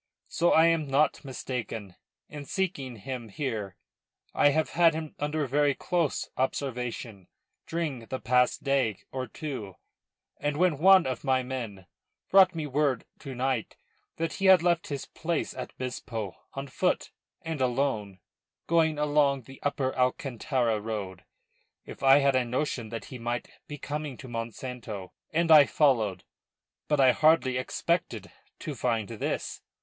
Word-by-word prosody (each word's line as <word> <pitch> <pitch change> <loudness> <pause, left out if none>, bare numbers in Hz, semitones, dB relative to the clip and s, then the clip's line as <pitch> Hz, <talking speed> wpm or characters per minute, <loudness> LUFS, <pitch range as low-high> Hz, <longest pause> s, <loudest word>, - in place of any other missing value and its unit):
So 175 +1 +2
I 160 - +6
am 165 -3 +2
not 140 +3 +2
mistaken 125 -7 -5 0.3
in 145 -1 -8
seeking 145 -9 -2
him 120 +1 -6
here. 110 -4 -4 0.6
I 145 - +5
have 155 +2 0
had 165 -2 +4
him 155 -1 -5
under 150 +1 -1
very 145 +1 +2
close 170 -5 -1
observation 125 -7 -3 0.4
during 150 -9 -3
the 130 - -4
past 125 +1 +2
day 135 -7 +1
or 130 -1 -3
two, 115 - -6 0.6
and 145 0 -1
when 175 -4 +2
one 190 +1 +7
of 130 -1 -3
my 130 -2 +2
men 115 -7 -5 0.5
brought 190 -2 +7
me 160 -2 -2
word 140 -3 0
tonight 130 -3 -2 0.4
that 165 0 -2
he 195 - -3
had 190 -3 +7
left 175 -1 +2
his 140 -2 -4
place 165 -1 -3
at - - -8
Bispo 115 -6 -5 0.2
on 135 0 -4
foot 180 +7 0 0.3
and 160 -4 -4
alone, 120 -7 -1 0.4
going 160 -2 +2
along 145 -2 +2
the 135 +3 -13
upper 140 -2 -1
Alcantara 125 -3 0
road, 100 -4 -5 0.6
If - - -10
had 135 0 +5
a 130 - +3
notion 125 -2 -2
that 115 0 -6
he 125 - -7
might 120 +1 -3 0.2
be 145 -3 -6
coming 150 -2 -5
to 130 - -10
Monsanto 115 -4 -6 0.2
and 165 +1 +1
I 150 -3 +9
followed. 110 - +2 0.6
But 150 -1 +1
I 130 -2 +7
hardly 155 -4 +3
expected 130 - -2 0.3
to 155 - -4
find 115 -4 -1
this. 115 -2 -3
135 Hz, 145 wpm, -28 LUFS, 120-150 Hz, 0.6 s, I